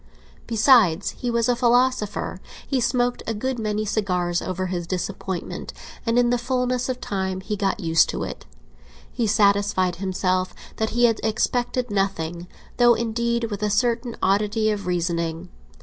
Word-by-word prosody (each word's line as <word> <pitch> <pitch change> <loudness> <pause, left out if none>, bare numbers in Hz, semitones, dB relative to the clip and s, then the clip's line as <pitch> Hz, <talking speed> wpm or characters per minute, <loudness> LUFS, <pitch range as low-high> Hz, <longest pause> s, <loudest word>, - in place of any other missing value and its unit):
Besides, 220 - +4
he 245 - -4
was 235 0 +1
a 245 - +3
philosopher; 245 -3 +1 0.3
he 265 -3 0
smoked 245 +1 +1
a 225 - -1
good 260 +3 -2
many 215 -1 -1
cigars 180 -5 0
over 185 0 -3
his 175 -2 -3
disappointment, 185 0 -4 0.3
and 230 +1 +2
in 245 -1 +4
the 245 - +2
fulness 250 0 -1
of 255 -1 -2
time 190 -4 -2
he 210 +2 -3
got 205 +2 -1
used 165 -3 +3
to - - -3
it. - - -7 0.6
He 235 - -1
satisfied 200 -3 +2
himself 185 -1 -1 0.2
that 220 0 0
he 240 - +3
had 225 -2 +2
expected 245 +2 0
nothing, 175 -4 -2 0.3
though, 240 -1 +6
indeed, 235 0 -1
with 205 - -4
a 210 - +1
certain 235 +2 0
oddity 210 +3 +2
of 200 -3 -4
reasoning. 170 -1 -2
210 Hz, 155 wpm, -23 LUFS, 185-240 Hz, 0.6 s, though